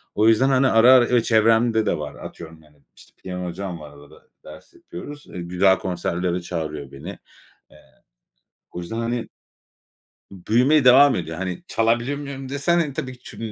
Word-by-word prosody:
O 110 Hz, +2 st, +3 dB
yüzden, 115 Hz, +4 st, +4 dB
hani, 130 Hz, 0 st, +3 dB
ara 115 Hz, +3 st, +6 dB
ara, 125 Hz, -2 st, +5 dB
eee, 120 Hz, -2 st, +2 dB
çevremde 110 Hz, 0 st, +2 dB
de 85 Hz, -, 0 dB
var. 75 Hz, -1 st, -7 dB
Atıyorum, 80 Hz, -1 st, -11 dB
yani, 75 Hz, -1 st, -25 dB, 0.2 s
işte, -, -, -19 dB
piyano 90 Hz, -1 st, -6 dB
hocam 90 Hz, 0 st, -6 dB
var, 75 Hz, -1 st, -11 dB
arada 70 Hz, 0 st, -17 dB, 0.2 s
ders 75 Hz, 0 st, -14 dB
yapıyoruz. 145 Hz, +12 st, -11 dB
Eee, 90 Hz, -, -8 dB
güzel 90 Hz, +2 st, +2 dB
konserlere 90 Hz, 0 st, -2 dB
çağırıyor 75 Hz, -5 st, -6 dB
beni. 75 Hz, +8 st, -9 dB, 0.5 s
Eee, -, -, -18 dB, 0.9 s
o -, -, -7 dB
yüzden, 110 Hz, +6 st, -6 dB
hani, 115 Hz, 0 st, -3 dB, 1.1 s
büyümeye 125 Hz, -, +2 dB
devam 135 Hz, +2 st, +7 dB
ediyor. 80 Hz, -2 st, -5 dB
Hani, 90 Hz, -1 st, -5 dB
çalabiliyor 120 Hz, +5 st, 0 dB
muyum 140 Hz, -2 st, -7 dB
desen, 145 Hz, +5 st, +1 dB
hani, 150 Hz, -4 st, -2 dB
tabii 130 Hz, -1 st, -5 dB
ki -, -, -38 dB
çü -, -, -10 dB
110 Hz, 170 wpm, -22 LUFS, 85-125 Hz, 1.1 s, devam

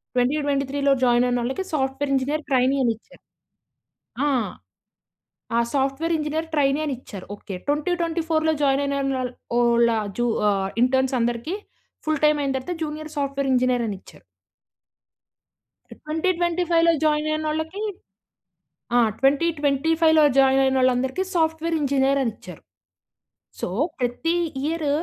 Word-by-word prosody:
2023లో 280 Hz, +1 st, +1 dB
join 245 Hz, 0 st, +4 dB
అయినోళ్ళకి 245 Hz, +7 st, -1 dB
software 275 Hz, 0 st, -1 dB
engineer 285 Hz, +4 st, -1 dB
trainee 260 Hz, +1 st, +3 dB
అని 235 Hz, -, +3 dB
ఇచ్చారు. -, -, -22 dB, 1.0 s
ఆ! -, -, +2 dB, 1.3 s
ఆ -, -, +4 dB, 0.2 s
సాఫ్ట్వేర్ 275 Hz, +5 st, 0 dB
ఇంజినీర్ 310 Hz, +1 st, -2 dB
ట్రైనీ 280 Hz, -1 st, +2 dB
అని 285 Hz, -, -1 dB
ఇచ్చారు. 200 Hz, -7 st, -10 dB
ఓకె. 200 Hz, -1 st, -8 dB
2024లో 320 Hz, +1 st, 0 dB
జాయిన్ 275 Hz, 0 st, +3 dB
అయి 280 Hz, -, -2 dB
నైనోళ్ 270 Hz, -2 st, -1 dB, 0.3 s
ఓళ్ళ 235 Hz, 0 st, +4 dB, 0.3 s
జు 240 Hz, -, +2 dB, 0.2 s
ఆహ్, 195 Hz, -1 st, 0 dB
ఇంటర్న్స్ 260 Hz, +1 st, +2 dB
అందరికి 240 Hz, +9 st, -1 dB, 0.5 s
ఫుల్ 310 Hz, -2 st, 0 dB
టైం 300 Hz, 0 st, +5 dB
అయిన 275 Hz, -1 st, 0 dB
తర్వాత 305 Hz, +7 st, -4 dB
జూనియర్ 310 Hz, 0 st, -6 dB
సాఫ్ట్వేర్ 275 Hz, -1 st, -1 dB
ఇంజినీర్ 250 Hz, -1 st, +2 dB
అని 205 Hz, -, -3 dB
ఇచ్చారు. -, -, -17 dB, 1.8 s
2025లో 335 Hz, +1 st, +1 dB
జాయిన్ 300 Hz, 0 st, +2 dB
అయినొళ్ళకి 315 Hz, +5 st, -2 dB, 1.2 s
ఆ! -, -, +6 dB, 0.2 s
2025లో 310 Hz, +2 st, +3 dB
జాయిన్ 270 Hz, 0 st, +5 dB
అయినోళ్ళందరికీ 265 Hz, +5 st, +1 dB
సాఫ్ట్వేర్ 320 Hz, 0 st, +1 dB
ఇంజినీర్ 275 Hz, 0 st, +2 dB
అనిచ్చారు. 185 Hz, -7 st, -6 dB, 1.0 s
సో, -, -, -2 dB, 0.3 s
ప్రతి 250 Hz, +8 st, -1 dB, 0.3 s
ఇయర్ 320 Hz, -1 st, -1 dB
280 Hz, 115 wpm, -23 LUFS, 260-315 Hz, 1.8 s, ఆ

